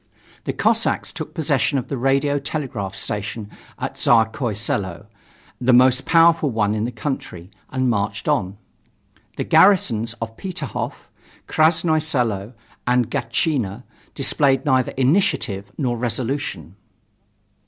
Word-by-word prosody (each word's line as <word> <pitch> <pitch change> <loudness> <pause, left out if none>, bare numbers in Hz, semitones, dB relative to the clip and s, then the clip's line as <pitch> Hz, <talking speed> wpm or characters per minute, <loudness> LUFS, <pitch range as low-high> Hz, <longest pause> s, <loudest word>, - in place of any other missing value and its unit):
The - - -2
Cossacks - - +1
took - - -7
possession 140 - +1
of 125 - -3
the 140 - -3
radio 135 +3 +1
telegraph 130 -10 -4
station 105 +1 -4 0.3
at - - -5
Tsarskoye 110 -1 +2
Selo, 100 -4 -2 0.5
the 125 +1 +3
most 130 +1 +5
powerful 165 -2 +5
one 110 -3 +1
in 110 0 -1
the 120 - -3
country, 105 - -5 0.2
and 130 -1 0
marched 100 -2 -1
on. 95 +1 0 0.8
The - - -1
garrisons 115 - +4
of 115 -1 -7
Peterhof, 185 -3 -5 0.4
Krasnoye 160 0 +3
Selo 120 -8 -1 0.3
and 125 -1 +2
Gatchina 120 -4 -1 0.3
displayed 135 -1 +2
neither 130 -3 +2
initiative 125 - +1
nor 125 -4 0
resolution. 115 - -3
125 Hz, 120 wpm, -21 LUFS, 105-140 Hz, 0.8 s, most